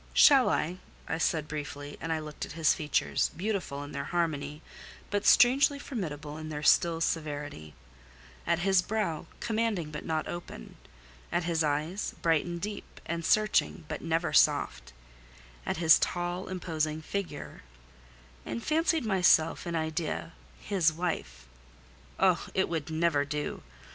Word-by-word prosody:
"Shall 275 -4 +7
I?" 175 +4 -1 0.3
I 160 - -2
said 155 -2 0
briefly; 145 -1 -6
and 165 - -3
I 160 - +1
looked 155 -1 -7
at - - -6
his 160 -2 +3
features, 150 -1 0
beautiful 185 -8 -2
in 145 - -9
their 140 0 -4
harmony, 155 -3 -2 0.5
but 205 0 0
strangely 275 +3 +6
formidable 155 - -5
in 155 0 -6
their 150 -1 -5
still 165 +2 +4
severity; 145 - -3 0.7
at 170 - +3
his 190 +1 +3
brow, 205 -6 -2
commanding 215 -8 -1
but 150 - -6
not 160 -1 -2
open; 175 - -8 0.6
at 175 - +1
his 165 -1 0
eyes, 155 +6 -1
bright 165 -3 +3
and 175 0 -4
deep 205 +3 -6
and 170 0 -3
searching, 215 -3 +2
but 150 - -5
never 165 +1 0
soft; 60 0 +3 0.8
at - - -1
his 160 -1 +6
tall 175 +1 -2
imposing 160 -4 -2
figure; 175 -6 -5 0.8
and 115 +1 -5
fancied 320 -2 +1
myself 180 -5 +3
in 170 - -2
idea 160 +1 -2 0.3
his 185 -6 +2
wife. 165 - -4 0.7
Oh! - - +3
it 190 - +2
would 160 -3 -3
never 160 -2 +2
do! 150 +1 -4
165 Hz, 145 wpm, -29 LUFS, 150-185 Hz, 0.8 s, Shall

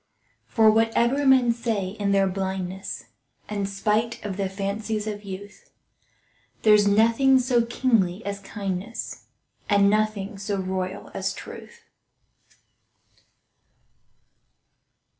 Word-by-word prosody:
For 220 -2 +5
whatever 235 +5 +2
men 255 -3 +5
say 225 -5 -2
in 200 0 -2
their 195 0 +4
blindness, 190 0 -4 0.4
And 200 -2 -2
spite 210 +3 -1
of 200 -2 -3
the 195 -1 -2
fancies 205 +2 -3
of 210 -1 -5
youth, 200 +1 -9 0.9
There's 210 -1 +6
nothing 230 +6 +4
so 250 -2 +2
kingly 225 -6 +1
as 200 0 -3
kindness, 200 +2 -5 0.4
And 200 -1 +5
nothing 215 -1 -1
so 200 0 -2
royal 185 0 -4
as - - -2
truth. 470 0 -11
205 Hz, 105 wpm, -25 LUFS, 195-225 Hz, 0.9 s, There's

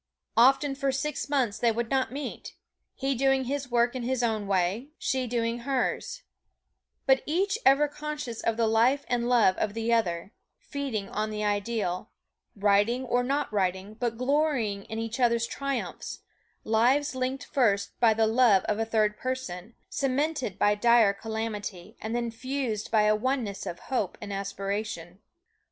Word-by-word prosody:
Often 270 +4 +5
for 275 0 0
six 285 +2 -3
months 255 -8 +1
they 235 -1 +3
would 230 0 -3
not 265 -2 +1
meet, 280 +2 -6 0.4
he 270 +1 -1
doing 270 +1 +2
his 275 +1 -3
work 240 +1 +2
in 255 - -3
his 250 +1 -1
own 220 -3 0
way, 195 +6 0
she 260 -1 -1
doing 230 0 -1
hers, 275 - -2 0.8
but 265 0 +4
each 390 +7 +1
ever 275 +2 +5
conscious 295 -5 -5
of 225 -1 0
the 230 - +2
life 235 +6 +3
and 240 -1 0
love 230 -6 +5
of 210 0 -1
the 230 +1 0
other 185 -3 0 0.2
feeding 260 -8 -4
on 215 +1 -2
the 210 0 -3
ideal 205 -2 -1 0.5
writing 205 +5 +2
or 245 0 +1
not 275 -1 -1
writing, 190 +1 -1
but 230 0 -2
glorying 255 -7 0
in 220 - -6
each 225 +2 -4
other's 235 -2 +3
triumphs 275 +2 -4 0.4
lives 255 +7 +2
linked 260 +1 -2
first 205 -7 +1
by 230 -2 +5
the 220 0 +3
love 220 -4 +4
of 210 0 -1
a 225 - +1
third 215 -2 +1
person, 235 -6 -4
cemented 275 - -1
by 205 0 +4
dire 230 -1 +5
calamity, 215 -2 -5
and 220 +2 -3
then 235 -1 -1
fused 255 -3 -3
by 215 -1 +4
a 210 0 +4
oneness 225 -4 -2
of 175 - -4
hope 245 -8 -2
and 205 -1 -6
aspiration. 195 -2 -4
235 Hz, 160 wpm, -28 LUFS, 210-265 Hz, 0.8 s, Often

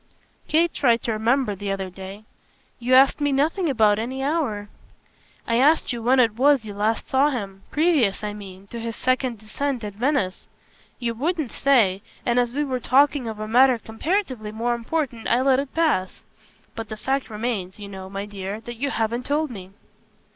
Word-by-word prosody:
Kate 330 +2 +2
tried 235 -4 +2
to 230 - -1
remember 225 +2 +1
the 200 0 -4
other 190 -1 -3
day. 195 +3 -9 0.6
"You 250 +1 +3
asked 270 +3 +5
me 290 0 +2
nothing 315 +6 +1
about 215 -5 +3
any 260 +4 -3
hour." 270 -9 -1 0.8
"I 230 +1 +1
asked 290 0 +3
you 235 - -5
when 255 +3 +3
it 225 -3 +3
was 275 -2 +4
you 210 - -6
last 215 +3 -1
saw 270 +3 +3
him 200 -8 -5
previous, 295 - +2
I 210 0 -3
mean, 195 -2 -10
to 235 - -5
his 230 -1 -4
second 255 -1 0
descent 240 +4 -3
at 205 -1 -5
Venice. 240 -4 -1 0.5
You 235 -2 -2
wouldn't 310 +2 -2
say, 220 -9 +3 0.2
and 240 0 +2
as 240 -1 +1
we 290 +4 -1
were 260 -3 -2
talking 275 0 +3
of 220 -1 -5
a 215 - -4
matter 250 +2 +5
comparatively 230 - -2
more 230 +3 -1
important 240 0 -3
I 240 - +3
let 265 0 +4
it 275 -1 -4
pass. 305 - +1 0.5
But 225 -1 -6
the 215 - -6
fact 270 +4 -1
remains, 210 -4 -3
you 205 - -7
know, 190 -1 -8
my 195 +1 -4
dear, 200 0 -6
that 240 +1 -8
you 280 +4 -1
haven't 235 +1 -2
told 300 0 0
me." 190 -5 -9
235 Hz, 190 wpm, -23 LUFS, 210-275 Hz, 0.8 s, asked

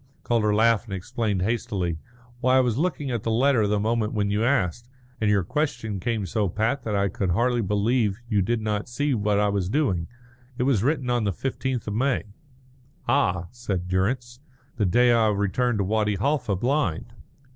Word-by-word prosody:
Calder 110 -3 +1
laughed 110 +1 +3
and 100 -4 -5
explained 105 -1 -2
hastily. 100 -7 -1 0.4
"Why, 130 +1 +3
I - - +6
was 125 -1 0
looking 150 -5 -1
at 120 -3 -2
the 115 - -3
letter 125 +2 +3
at 105 - +1
the 105 0 +1
moment 110 0 0
when 100 -1 0
you 105 +2 +1
asked, 120 - 0 0.3
and 105 - +2
your 100 -2 +3
question 120 - -2
came 110 +1 -1
so 100 +2 -1
pat 115 +8 0
that 110 -4 -3
I 100 0 +2
could 95 0 -2
hardly 120 +6 +2
believe 105 +1 +1
you 105 -4 +1
did 115 +4 0
not 105 +1 -2
see 145 +4 0
what 105 -3 +1
I 105 0 +2
was 100 -3 -1
doing. 100 - 0 0.5
It - - 0
was 130 -6 +2
written 130 0 0
on 120 -2 +1
the 100 - +1
fifteenth 130 +2 -3
of 105 - -2
May." 130 +4 +1 0.8
"Ah," 90 -1 +1
said 100 -7 -4
Durrance, 120 +7 -1 0.4
"the 105 - +1
day 120 +7 +4
I 115 -2 +4
returned 105 +4 0
to 100 - +1
Wadi 105 +1 +1
Halfa 125 -1 0
blind." 120 - -1
110 Hz, 190 wpm, -25 LUFS, 100-125 Hz, 0.8 s, I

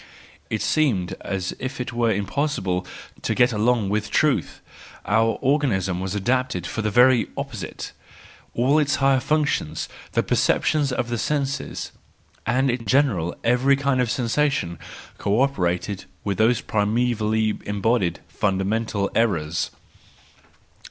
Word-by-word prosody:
It 110 - -2
seemed 120 - +1
as 95 -2 -3
if 130 +2 -5
it 125 0 -4
were 120 -1 +2
impossible 100 -4 -1 0.3
to - - -1
get 125 0 +4
along 110 -1 +1
with 105 +1 -1
truth, 150 -3 +1 0.5
our 115 +1 +2
organism 110 -11 +1
was 95 +2 -3
adapted 120 -3 0
for 110 - -3
the 110 - 0
very 125 +2 +5
opposite; 135 -8 -5 0.6
all 135 +6 +3
its 145 -1 +2
higher 135 -1 +3
functions, 135 - 0 0.3
the - - +2
perceptions 145 -3 +2
of 120 -1 -2
the 120 -1 -2
senses, 140 0 -2 0.6
and 130 +3 +2
in 120 -1 -4
general 100 - +2
every 125 +4 +4
kind 140 -2 +1
of 125 - 0
sensation 125 - 0 0.4
co 100 +3 +1
operated 100 -7 0 0.2
with 100 -1 -2
those 115 +2 +3
primevally 110 0 0
embodied, 105 -2 0
funda¬ 95 -2 -1
mental 105 -1 -1
errors. 85 -8 0
115 Hz, 130 wpm, -23 LUFS, 100-130 Hz, 0.6 s, very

